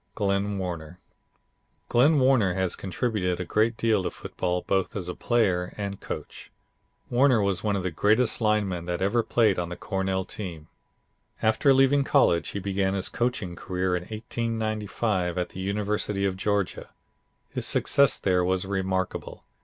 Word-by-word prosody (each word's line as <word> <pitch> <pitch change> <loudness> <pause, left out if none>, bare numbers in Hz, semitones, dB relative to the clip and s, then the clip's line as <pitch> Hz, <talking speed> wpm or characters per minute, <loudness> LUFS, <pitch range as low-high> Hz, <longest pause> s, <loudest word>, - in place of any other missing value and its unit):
Glenn 100 -1 0
Warner 90 -2 -5 0.9
Glenn 140 +6 +4
Warner 130 -9 +3
has 95 -2 0
contributed 95 -2 -2
a 90 - -3
great 110 +4 +1
deal 110 -3 +2
to 90 - -2
football, 90 0 -3
both 95 -1 0
as 95 -4 -4
a 90 - -3
player 95 -8 0
and 100 -1 -4
coach. - - -7 0.6
Warner 125 -1 +4
was 100 -3 0
one 105 -2 +1
of 95 - -2
the 95 - -1
greatest 110 +9 +2
linemen 100 -5 +1
that 90 -1 -2
ever 110 +5 +2
played 110 -5 +2
on 85 -1 -3
the 90 - -5
Cornell 95 0 -2
team. 85 -8 -7 0.7
After 110 +5 +4
leaving 135 +1 +4
college 85 -9 +3
he 100 - -4
began 95 0 0
his 95 - -3
coaching 115 -7 -2
career 90 0 -1
in 90 - -2
1895 110 -4 -2
at 90 - -1
the - - -9
University 100 0 -1
of 95 -1 0
Georgia. 100 0 -1 0.6
His - - -3
success 140 -1 +3
there 90 -2 +1
was 95 +1 0
remarkable. 95 -1 -3
100 Hz, 155 wpm, -26 LUFS, 90-110 Hz, 0.9 s, Glenn